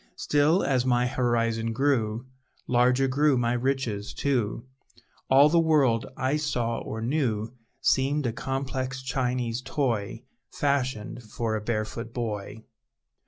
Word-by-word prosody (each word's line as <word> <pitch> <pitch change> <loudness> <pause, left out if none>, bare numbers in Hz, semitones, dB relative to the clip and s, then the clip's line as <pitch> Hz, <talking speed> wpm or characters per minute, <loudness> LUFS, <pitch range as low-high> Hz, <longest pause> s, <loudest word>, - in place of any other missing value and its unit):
Still, 150 +5 +2
as 130 -3 +2
my 125 -1 +2
horizon 115 -2 0
grew, 120 -3 0 0.4
Larger 125 +2 +3
grew 140 +1 +3
my 120 0 +1
riches, 120 -5 -2
too; 120 -5 -1 0.6
All 135 +2 +7
the 170 +3 +3
world 145 -8 +3
I 130 +3 +1
saw 120 -6 -1
or 110 0 -5
knew 115 -4 -1 0.3
Seemed 135 +2 +2
a 115 - 0
complex 130 0 -3
Chinese 125 -2 -1
toy, 125 -7 -2 0.3
Fashioned 130 -5 -1
for 110 0 -3
a 110 - -2
barefoot 115 +1 -3
boy! 110 -2 -4
125 Hz, 120 wpm, -26 LUFS, 115-135 Hz, 0.6 s, All